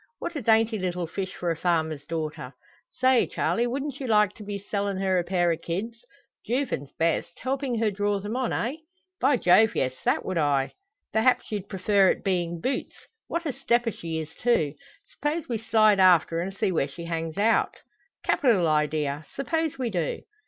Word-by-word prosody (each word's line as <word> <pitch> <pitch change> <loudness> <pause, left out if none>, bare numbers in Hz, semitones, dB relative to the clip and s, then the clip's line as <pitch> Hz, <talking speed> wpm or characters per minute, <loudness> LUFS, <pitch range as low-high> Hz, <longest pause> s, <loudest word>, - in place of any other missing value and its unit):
What 345 - -5
a 290 - -2
dainty 225 -1 +3
little 180 -1 -2
fish 185 +3 -5
for 175 -1 -1
a - - -1
farmer's 160 -4 -1
daughter! 155 -5 -4 0.4
Say, 255 -1 +3
Charley! 235 +1 0
wouldn't 275 +2 -3
you 265 - -4
like 210 -3 +4
to 215 - -11
be 205 0 -4
sellin' 200 0 -2
her 190 -1 +1
a - - 0
pair 175 -1 +1
of 165 0 -3
kids 225 +9 -4 0.4
Jouvin's 235 - -2
best 165 +1 0
helpin' 260 -2 -2
her 220 -1 +1
draw 205 +1 0
them 205 +4 -5
on, 255 -2 -1
eh?" 255 +6 -1 0.4
"By 280 - +3
Jove, 220 +3 +5
yes! 130 -1 0
That - - +1
would 185 -3 -1
I." 140 -3 +1 0.4
"Perhaps 225 +2 +2
you'd 205 -2 -4
prefer 195 0 +3
it - - -1
being 175 -3 -1
boots? 255 +8 -2 0.3
What 335 0 -3
a 290 - -1
stepper 240 -3 +1
she 165 -4 -5
is, 160 0 -5
too! 160 -12 +1 0.3
S'pose 300 +3 -3
we 235 -3 -2
slide 215 -2 +4
after, 175 -3 +5
and 180 +3 -2
see 205 -2 +1
where 155 -5 +1
she 170 +4 -9
hangs 165 -1 -3
out?" 220 +3 +2 0.5
"Capital 220 - +3
idea! 150 -1 0
Suppose 320 +2 -1
we 250 -3 -2
do?" 170 -5 -2
200 Hz, 185 wpm, -26 LUFS, 170-235 Hz, 0.5 s, Jove